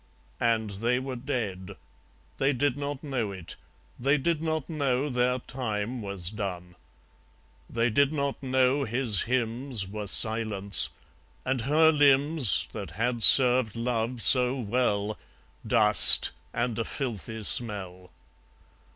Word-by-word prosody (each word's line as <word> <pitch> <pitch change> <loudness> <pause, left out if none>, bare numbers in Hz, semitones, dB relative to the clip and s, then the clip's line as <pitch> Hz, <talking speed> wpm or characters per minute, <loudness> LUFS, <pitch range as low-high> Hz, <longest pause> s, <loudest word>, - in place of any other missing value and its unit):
And 115 -3 -2
they 115 +5 -3
were 130 0 -7
dead. 115 -8 -7 0.6
They 140 +2 -1
did 135 +1 -2
not 145 0 -7
know 125 -8 -5
it. 95 -4 -10 0.4
They 140 +4 0
did 155 +2 -3
not 160 -2 -4
know 140 -3 -3
their 125 0 -2
time 120 -2 -6
was 100 -3 -4
done. 90 -4 -8 1.0
They 115 0 -2
did 140 +5 0
not 140 -2 -5
know 130 +1 -1
his 120 -4 -2
hymns 120 -3 -3
Were 105 +1 -8
silence; 105 -1 +3 0.6
and 130 -1 -3
her 155 +6 +2
limbs, 145 - +2
That - - -9
had 120 +1 -3
served 125 -3 +7
Love 115 0 -4
so 125 0 +5
well, 105 -3 -3 0.5
Dust, - - +7 0.2
and 120 -1 -4
a - - -2
filthy 110 -3 -7
smell. 95 -5 -3
120 Hz, 125 wpm, -25 LUFS, 105-135 Hz, 1.0 s, served